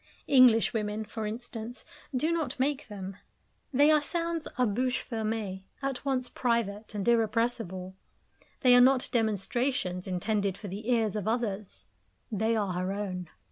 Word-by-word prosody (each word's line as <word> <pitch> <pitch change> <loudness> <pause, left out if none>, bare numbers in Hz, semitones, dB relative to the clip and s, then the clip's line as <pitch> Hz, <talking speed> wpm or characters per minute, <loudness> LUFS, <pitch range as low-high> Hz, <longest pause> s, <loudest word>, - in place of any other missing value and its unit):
English 255 -5 +6
women, 215 -1 -2
for 220 0 -4
instance, 230 +1 -6 0.3
do 290 +5 +1
not 330 -5 -2
make 280 +2 0
them. 195 -2 -7 0.5
They 290 +3 +5
are 305 -1 +5
sounds 335 +1 -2
a 250 - +4
bouche 250 +4 0
fermee, 215 -4 -3
at 275 -2 -3
once 260 -3 0
private 225 -4 -1
and 200 0 -2
irrepressible. 225 -5 +1 0.7
They 250 -2 +6
are 245 - +8
not 260 0 +4
demonstrations 220 -3 0
intended 200 +1 0
for 205 - -7
the 210 +5 -5
ears 225 -4 +2
of 210 -1 -2
others; 210 - -2 0.5
they 220 +2 +1
are 200 -4 0
her 185 +2 -1
own. 185 -4 -4
225 Hz, 145 wpm, -29 LUFS, 200-250 Hz, 0.7 s, are